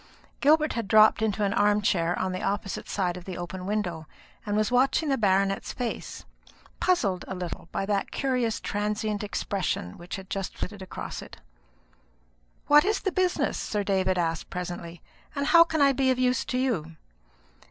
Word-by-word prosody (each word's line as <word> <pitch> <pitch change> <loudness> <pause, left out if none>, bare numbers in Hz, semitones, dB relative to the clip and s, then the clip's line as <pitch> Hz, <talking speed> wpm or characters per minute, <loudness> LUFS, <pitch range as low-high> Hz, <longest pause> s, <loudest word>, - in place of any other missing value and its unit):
Gilbert 305 +2 +4
had 230 -3 -3
dropped 215 +1 +6
into 215 -1 0
an 200 0 +1
arm 205 -1 +3
chair 175 -4 +1
on 185 0 -1
the 185 - -4
opposite 195 0 -3
side 180 -3 -1
of 180 - -10
the 185 -2 -6
open 180 +1 -6
window, 180 -7 -2 0.4
and 205 0 0
was 215 +1 +1
watching 270 +5 +2
the 270 - +3
baronet's 195 -2 +1
face, 245 -2 -5 0.5
puzzled 220 - +1
a 190 - -4
little 175 -2 -6
by 195 - -2
that 200 -1 -1
curious 250 -5 0
transient 210 0 -2
expression 195 - -3
which 175 +2 -6
had 190 -1 -9
just 195 0 -4
flitted 195 +1 -5
across 185 - -6
it. - - -11 1.3
"What 295 0 +7
is 405 +1 0
the 385 - -1
business?" 365 0 0
Sir 210 -1 -2
David 190 -2 +1
asked 165 -2 -1
presently; 175 -1 -6 0.3
"and 280 0 -1
how 335 +3 +8
can 320 -2 -1
I 280 -1 +6
be 265 0 +1
of 255 - +2
use 255 -1 +1
to 250 - -2
you?" 190 -12 -1
205 Hz, 175 wpm, -27 LUFS, 185-250 Hz, 1.3 s, how